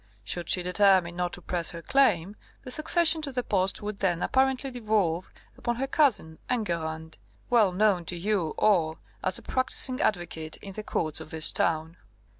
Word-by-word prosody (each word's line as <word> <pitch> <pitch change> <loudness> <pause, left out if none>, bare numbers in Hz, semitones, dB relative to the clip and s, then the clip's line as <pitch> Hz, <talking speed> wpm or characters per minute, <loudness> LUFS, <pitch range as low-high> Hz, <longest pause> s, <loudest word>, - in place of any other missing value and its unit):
Should 170 +10 -3
she 180 - +2
determine 180 -1 +3
not 180 0 -2
to 180 - -9
press 175 -2 -2
her 170 -1 -8
claim, 205 -8 +2 0.3
the 255 - -7
succession 320 +2 +3
to 290 -2 -4
the 250 -1 -2
post 195 0 0
would 210 -1 -5
then 180 -3 0
apparently 265 0 +1
devolve 210 -8 -1 0.2
upon 240 - -2
her 260 +3 -2
cousin 225 - +1
Enguerrand, 160 -8 -3 0.3
well 220 -6 +4
known 185 -2 +2
to 175 - -5
you 180 -3 -1
all 165 -7 +2 0.3
as 185 0 +1
a - - -10
practising 255 0 +1
advocate 170 -5 -2
in 195 - -10
the 215 - -5
courts 155 -6 -2
of - - -10
this 160 -1 +4
town. 160 +1 0
190 Hz, 175 wpm, -27 LUFS, 170-240 Hz, 0.3 s, well